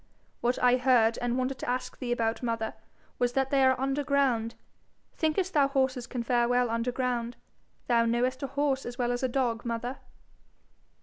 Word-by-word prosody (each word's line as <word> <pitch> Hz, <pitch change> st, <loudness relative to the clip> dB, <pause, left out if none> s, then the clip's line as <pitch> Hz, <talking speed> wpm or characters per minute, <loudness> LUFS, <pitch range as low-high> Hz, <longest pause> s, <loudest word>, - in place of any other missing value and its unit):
'What 245 Hz, +1 st, 0 dB
I 250 Hz, 0 st, +5 dB
heard, 245 Hz, -3 st, +3 dB
and 245 Hz, 0 st, -1 dB
wanted 260 Hz, 0 st, -2 dB
to -, -, -4 dB
ask 250 Hz, 0 st, -3 dB
thee 245 Hz, -2 st, -3 dB
about, 230 Hz, -1 st, 0 dB
mother, 230 Hz, -2 st, -2 dB, 0.5 s
was 245 Hz, 0 st, +1 dB
that 270 Hz, -1 st, 0 dB
they 275 Hz, -1 st, +4 dB
are 260 Hz, -1 st, +4 dB
under 275 Hz, +2 st, 0 dB
ground. 255 Hz, -5 st, +1 dB, 0.6 s
Thinkest 345 Hz, +4 st, 0 dB
thou 285 Hz, -2 st, +4 dB
horses 265 Hz, -3 st, 0 dB
can 245 Hz, -1 st, -4 dB
fare 240 Hz, 0 st, +2 dB
well 245 Hz, -1 st, +2 dB
under 230 Hz, +2 st, -1 dB
ground? 245 Hz, -1 st, -2 dB, 0.5 s
Thou 235 Hz, -1 st, +3 dB
knowest 245 Hz, +3 st, 0 dB
a 275 Hz, -, -2 dB
horse 275 Hz, 0 st, 0 dB
as 240 Hz, 0 st, -7 dB
well 245 Hz, -1 st, 0 dB
as 245 Hz, -, -2 dB
a 260 Hz, -, +1 dB
dog, 240 Hz, -3 st, -1 dB
mother.' 240 Hz, +2 st, -4 dB
250 Hz, 185 wpm, -28 LUFS, 235-265 Hz, 0.6 s, I